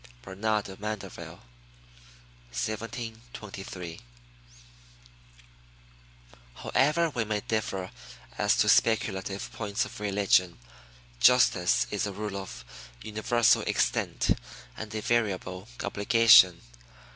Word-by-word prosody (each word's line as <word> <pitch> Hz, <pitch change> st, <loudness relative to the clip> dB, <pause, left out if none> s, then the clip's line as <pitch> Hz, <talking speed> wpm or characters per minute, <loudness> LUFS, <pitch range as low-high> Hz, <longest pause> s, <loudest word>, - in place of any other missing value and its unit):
Bernard 105 Hz, +2 st, -1 dB
de 95 Hz, -, -8 dB
Mandeville, 105 Hz, -1 st, -6 dB, 1.1 s
1723. 110 Hz, -, -6 dB, 2.6 s
However 155 Hz, +5 st, +1 dB
we 120 Hz, -4 st, -1 dB
may 105 Hz, -1 st, -2 dB
differ 100 Hz, -4 st, -3 dB, 0.4 s
as -, -, +2 dB
to -, -, +3 dB
speculative 100 Hz, -3 st, +1 dB
points 105 Hz, -2 st, -2 dB
of -, -, -10 dB
religion, 100 Hz, -5 st, +2 dB, 0.6 s
justice 90 Hz, -, +4 dB
is -, -, -1 dB
a -, -, -4 dB
rule 105 Hz, 0 st, -5 dB
of 95 Hz, -11 st, -8 dB, 0.4 s
universal 110 Hz, +2 st, +2 dB
extent -, -, 0 dB, 0.4 s
and 110 Hz, 0 st, -7 dB
invariable 105 Hz, -4 st, -1 dB, 0.2 s
obligation. 100 Hz, -4 st, +5 dB
105 Hz, 85 wpm, -28 LUFS, 95-115 Hz, 2.6 s, obligation